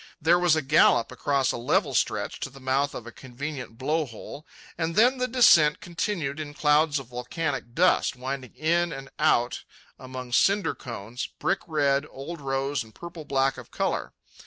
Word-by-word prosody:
There 170 Hz, +2 st, +4 dB
was 175 Hz, -3 st, +4 dB
a 155 Hz, -, 0 dB
gallop 135 Hz, -4 st, +4 dB
across 140 Hz, -2 st, 0 dB
a -, -, -4 dB
level 120 Hz, -, +1 dB
stretch -, -, -1 dB
to -, -, -4 dB
the 135 Hz, +1 st, -14 dB
mouth 135 Hz, +2 st, 0 dB
of 120 Hz, -, -7 dB
a 120 Hz, -, -8 dB
convenient 130 Hz, -1 st, -7 dB
blow 150 Hz, +4 st, 0 dB
hole, 130 Hz, +6 st, -10 dB, 0.3 s
and 165 Hz, 0 st, -2 dB
then 250 Hz, +4 st, +4 dB
the 250 Hz, -, +1 dB
descent 170 Hz, -12 st, +5 dB
continued 170 Hz, -5 st, -3 dB
in 145 Hz, -1 st, -6 dB
clouds 150 Hz, 0 st, +3 dB
of 135 Hz, -, -5 dB
volcanic 125 Hz, 0 st, -4 dB
dust, 180 Hz, -5 st, +3 dB
winding 130 Hz, 0 st, -6 dB
in 170 Hz, +2 st, +1 dB
and 135 Hz, -2 st, -8 dB
out 125 Hz, -6 st, +2 dB, 0.4 s
among 130 Hz, -1 st, -8 dB
cinder 195 Hz, +6 st, +3 dB
cones, 115 Hz, 0 st, -6 dB
brick 195 Hz, -, 0 dB
red, 145 Hz, -2 st, +1 dB
old 150 Hz, +4 st, -8 dB
rose, 135 Hz, 0 st, -1 dB
and 110 Hz, -1 st, -18 dB
purplish 170 Hz, -3 st, -9 dB
black 135 Hz, -1 st, +1 dB
of 120 Hz, -, -12 dB
colour. -, -, -2 dB
145 Hz, 175 wpm, -26 LUFS, 130-165 Hz, 0.4 s, descent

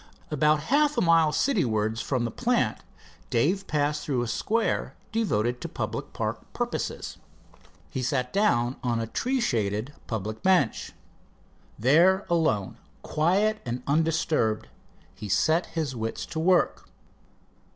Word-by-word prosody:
About 150 Hz, 0 st, +3 dB
half 300 Hz, 0 st, +3 dB
a -, -, +3 dB
mile 165 Hz, -3 st, +4 dB
city 245 Hz, -, +2 dB
wards 110 Hz, -1 st, 0 dB
from 125 Hz, -2 st, -1 dB
the 115 Hz, -, -3 dB
plant -, -, 0 dB, 0.5 s
Dave 180 Hz, +12 st, +1 dB
passed 150 Hz, 0 st, 0 dB
through 130 Hz, -5 st, 0 dB
a -, -, -3 dB
square 220 Hz, -, -1 dB, 0.2 s
devoted 125 Hz, -, 0 dB
to -, -, -5 dB
public -, -, -4 dB
park -, -, -3 dB
purposes. -, -, -3 dB, 0.7 s
He 130 Hz, -, -3 dB
sat 125 Hz, 0 st, -1 dB
down 130 Hz, -, +2 dB
on 120 Hz, -2 st, 0 dB
a 115 Hz, -, -1 dB
tree 255 Hz, -, -1 dB
shaded 110 Hz, -, -1 dB, 0.2 s
rustic 110 Hz, 0 st, -3 dB
bench. 185 Hz, -10 st, +2 dB, 0.8 s
There, 170 Hz, -, +4 dB
alone, 110 Hz, -, +1 dB, 0.2 s
quiet 200 Hz, +7 st, +1 dB
and 120 Hz, +1 st, -4 dB
undisturbed, 155 Hz, -7 st, +1 dB, 0.4 s
he 105 Hz, -, -8 dB
set 160 Hz, -, +2 dB
his 160 Hz, -5 st, -3 dB
wits 115 Hz, -1 st, -3 dB
at 165 Hz, -, -11 dB
work. 175 Hz, +3 st, +2 dB
150 Hz, 130 wpm, -26 LUFS, 115-175 Hz, 0.8 s, mile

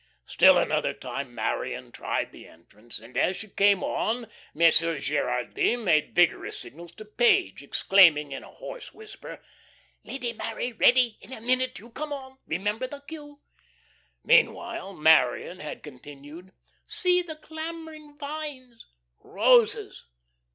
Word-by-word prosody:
Still -, -, +6 dB
another -, -, 0 dB
time -, -, -6 dB
Marion -, -, -3 dB
tried -, -, -3 dB
the -, -, -14 dB
entrance, 105 Hz, +8 st, -9 dB
and, 115 Hz, +3 st, -15 dB
as 180 Hz, +8 st, +1 dB
she 215 Hz, -, -8 dB
came 200 Hz, -1 st, +3 dB
on, 230 Hz, 0 st, -2 dB, 0.2 s
Monsieur 165 Hz, 0 st, +3 dB
Gerardy 145 Hz, -, 0 dB
made 175 Hz, -11 st, +1 dB
vigorous 175 Hz, -2 st, +2 dB
signals 170 Hz, +3 st, -11 dB
to 215 Hz, -, -11 dB
Page, 395 Hz, -, +2 dB
exclaiming 160 Hz, -7 st, +4 dB
in 135 Hz, -, -6 dB
a -, -, -12 dB
hoarse -, -, -10 dB
whisper: 435 Hz, -1 st, -11 dB, 0.6 s
"Lady 245 Hz, -3 st, -4 dB
Mary, 230 Hz, +2 st, -4 dB
ready. 245 Hz, 0 st, +4 dB
In -, -, -14 dB
a 260 Hz, -, -6 dB
minute 255 Hz, +3 st, 0 dB
you 235 Hz, +2 st, -13 dB
come 300 Hz, +5 st, -5 dB
on. 265 Hz, -2 st, -8 dB
Remember 210 Hz, +9 st, -2 dB
the 280 Hz, +2 st, -10 dB
cue." 290 Hz, -1 st, -11 dB, 0.8 s
Meanwhile 195 Hz, +1 st, +2 dB
Marion 160 Hz, +1 st, +3 dB
had 155 Hz, -, -8 dB
continued: 145 Hz, +5 st, -12 dB, 0.4 s
"'See 360 Hz, 0 st, +2 dB
the 330 Hz, -3 st, -7 dB
clambering 315 Hz, -1 st, -9 dB
vines 285 Hz, -5 st, -7 dB, 0.2 s
'" -, -, -51 dB
"Roses." 470 Hz, -3 st, +2 dB
230 Hz, 135 wpm, -26 LUFS, -, 0.8 s, Still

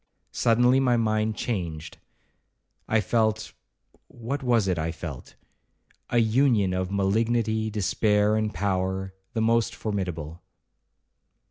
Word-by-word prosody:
Suddenly 120 Hz, +3 st, +3 dB
my 125 Hz, -3 st, +2 dB
mind 110 Hz, -1 st, 0 dB
changed: 85 Hz, -10 st, -4 dB, 0.9 s
I 110 Hz, 0 st, +2 dB
felt—what 110 Hz, +4 st, -4 dB
was 120 Hz, -6 st, +2 dB
it 90 Hz, -3 st, 0 dB
I 80 Hz, +1 st, -1 dB
felt?—a 80 Hz, -, -9 dB
union 115 Hz, -4 st, +3 dB
of 95 Hz, 0 st, -2 dB
malignity, 110 Hz, +2 st, 0 dB
despair, 105 Hz, +1 st, +1 dB
and 110 Hz, -1 st, 0 dB
power, 95 Hz, -1 st, -2 dB, 0.2 s
the 115 Hz, -, -1 dB
most 115 Hz, 0 st, +2 dB
formidable. 90 Hz, -6 st, -4 dB
110 Hz, 100 wpm, -26 LUFS, 95-115 Hz, 0.9 s, Suddenly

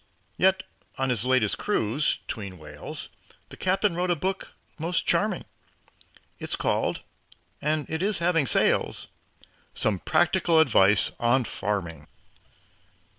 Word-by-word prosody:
Yet 190 Hz, +1 st, +3 dB, 0.3 s
on 135 Hz, -1 st, 0 dB
his 120 Hz, -1 st, -1 dB
latest 130 Hz, -5 st, +2 dB
cruise, 140 Hz, -, 0 dB
'tween 100 Hz, -4 st, -6 dB
whales 75 Hz, -2 st, -8 dB, 0.4 s
The -, -, -10 dB
Captain 190 Hz, +1 st, +1 dB
wrote 180 Hz, +1 st, -1 dB
a 175 Hz, -, +3 dB
book 190 Hz, +4 st, -3 dB, 0.3 s
most 165 Hz, +2 st, -1 dB
charming. -, -, +1 dB, 0.9 s
It's -, -, -3 dB
called -, -, -1 dB, 0.6 s
and 150 Hz, 0 st, 0 dB
it 160 Hz, +1 st, -3 dB
is 205 Hz, +1 st, +1 dB
having 170 Hz, -4 st, +2 dB
sales -, -, +1 dB, 0.7 s
"Some 100 Hz, -4 st, 0 dB
Practical 170 Hz, -, +2 dB
Advice 105 Hz, -, +4 dB
on 120 Hz, +2 st, +3 dB
Farming." 85 Hz, -10 st, -4 dB
140 Hz, 120 wpm, -26 LUFS, 105-175 Hz, 0.9 s, Advice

